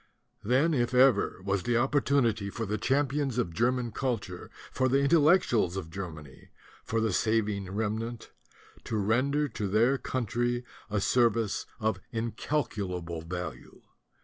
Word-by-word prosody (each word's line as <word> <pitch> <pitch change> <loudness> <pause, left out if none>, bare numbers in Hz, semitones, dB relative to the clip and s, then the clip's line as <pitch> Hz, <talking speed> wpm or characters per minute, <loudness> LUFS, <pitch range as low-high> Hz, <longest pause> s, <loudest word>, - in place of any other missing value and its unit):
Then, 135 +9 +3
if 125 -2 0
ever, 125 -8 +4
was 100 -1 0
the 115 +6 +1
opportunity 125 -5 +1
for 115 +3 -4
the 105 +1 -2
champions 140 -1 0
of 90 -9 -1
German 120 +3 0
cul 130 -1 0
ture, 90 -3 -10 0.2
for 130 0 +1
the 135 - +3
Intellectuals 140 - +3
of 80 -4 -6
Germany, 80 -7 -8 0.3
for 115 - -1
the 110 -3 0
saving 105 -3 0
remnant, 110 +3 -3 0.5
to 110 - -2
render 130 +8 +1
to 105 -3 -3
their 115 +7 +3
country 120 0 -1 0.2
a 105 0 0
service 115 -1 +1
of 110 -4 0
incalculable 105 - -3
value. 90 +2 -7
115 Hz, 135 wpm, -29 LUFS, 100-130 Hz, 0.5 s, ever